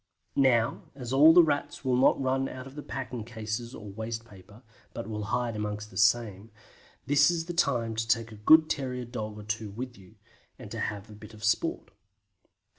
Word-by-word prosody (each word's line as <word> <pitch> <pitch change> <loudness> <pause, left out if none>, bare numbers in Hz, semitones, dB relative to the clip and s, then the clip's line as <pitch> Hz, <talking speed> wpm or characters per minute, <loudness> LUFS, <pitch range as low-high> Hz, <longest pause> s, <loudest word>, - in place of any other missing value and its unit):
Now 120 -4 +3
as 125 -2 -5
all 150 +4 +8
the 175 +1 +8
Rats 145 -2 -2
will 130 -1 +2
not 130 +2 +4
run 135 0 0
out 130 0 -8
of 135 - -11
the 150 - -7
packing 125 -5 -5
cases 110 +2 -5
or 105 -2 -9
waste 115 +2 -5
paper, 100 +3 -16 0.3
but 115 - -4
will 105 -1 -4
hide 120 +1 -1
amongst 105 0 -4
the - - -14
same, 110 -2 +2 0.6
this 145 +2 +5
is 170 -2 -1
the 175 - -5
time 125 -9 +1
to 115 0 -2
take 115 0 +1
a - - -9
good 155 +7 +7
terrier 125 -4 -3
dog 110 -3 -6
or 105 - -8
two 110 0 -3
with 120 +3 -7
you, 95 -2 -17 0.4
and - - -11
to - - -5
have 105 -1 -4
a 110 - -12
bit 105 +1 -12
of 110 - -13
sport. 110 - 0
115 Hz, 200 wpm, -28 LUFS, 110-130 Hz, 0.6 s, all